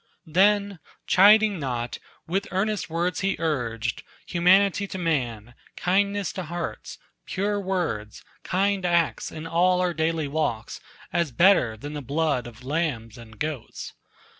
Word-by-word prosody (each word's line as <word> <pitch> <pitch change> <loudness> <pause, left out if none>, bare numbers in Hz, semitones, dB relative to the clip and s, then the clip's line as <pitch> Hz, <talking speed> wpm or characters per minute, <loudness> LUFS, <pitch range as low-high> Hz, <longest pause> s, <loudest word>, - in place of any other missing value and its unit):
Then, 200 +3 +2 0.3
chiding 205 0 +6
not, 120 -4 -3 0.3
with 195 +4 -2
earnest 195 -2 -1
words 170 +2 -1
he 195 0 0
urged 120 -8 -2 0.2
Humanity 195 +3 +3
to 190 - -6
man, 125 - -2 0.2
kindness 200 +2 0
to 185 - -4
beasts, 175 0 -5 0.3
Pure 205 +1 -1
words, 175 - -3 0.2
kind 195 +1 0
acts, 170 -2 +1
in 155 0 -7
all 180 +2 +2
our 180 -1 +1
daily 160 -1 0
walks. 140 -7 -2 0.3
As 170 -5 +1
better 145 - +4
than 145 +7 -7
the 150 - -4
blood 145 -2 0
of 120 +1 -13
lambs 135 -7 -2
and 115 -3 -13
goats. 150 -2 -5
165 Hz, 135 wpm, -25 LUFS, 135-190 Hz, 0.3 s, chiding